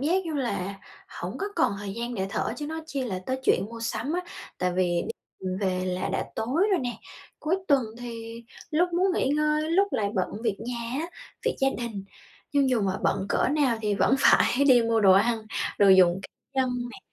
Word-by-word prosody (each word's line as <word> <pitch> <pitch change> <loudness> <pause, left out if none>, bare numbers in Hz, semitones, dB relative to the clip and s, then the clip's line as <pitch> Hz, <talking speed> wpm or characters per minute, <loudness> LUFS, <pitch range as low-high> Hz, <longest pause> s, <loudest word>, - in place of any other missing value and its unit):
giác 350 +7 +1
như 315 - -3
là 200 -8 -2 0.5
hổng 185 +8 -5
có 395 - -2
còn 325 -11 +3
thời 200 -1 -5
gian 235 +2 -4
để 190 -3 -1
thở - - -1
chứ 295 - -5
nói 320 +1 -4
chi 280 -4 -3
là 190 -6 -3
tới 260 0 -1
chuyện 185 - +3
mua 230 0 -8
sắm 230 +5 -2
á, 355 - 0 0.4
tại 180 0 0
vì 175 -1 +1 0.4
đi 190 - -6
về 185 -2 0
là 180 0 -2
đã - - 0
tối 260 +10 0
rồi 380 - +3
nè, 245 -2 -3 0.4
cuối 325 +4 +1
tuần 280 -3 +5 0.2
thì 230 -1 -7 0.3
lúc 340 +3 +3
muốn 365 +2 +2
nghỉ 265 - +1
ngơi, 300 +2 +1
lúc 395 +4 +3
lại 205 -2 +1
bận 185 -3 0
việc 220 -4 0
nhà 235 0 -4
á, 330 - -2 0.4
việc - - +1
gia 270 - +4
đình. 225 -5 -5 0.5
Nhưng 280 -2 +3
dù 245 -3 +2
mà 190 -1 0
bận 190 - +1
cỡ - - +2
nào 275 -4 +2
thì 210 -1 +1
vẫn 240 - +3
phải 270 0 +4
đi 245 -3 +7
mua 230 0 +2
đồ 195 -2 +7
ăn, 220 +3 +2 0.3
đồ 200 - +6
dùng 185 -1 +6
c - - -14 0.3
nhân 260 -1 +2 0.2
nè, - - -10
235 Hz, 215 wpm, -26 LUFS, 200-290 Hz, 0.5 s, đi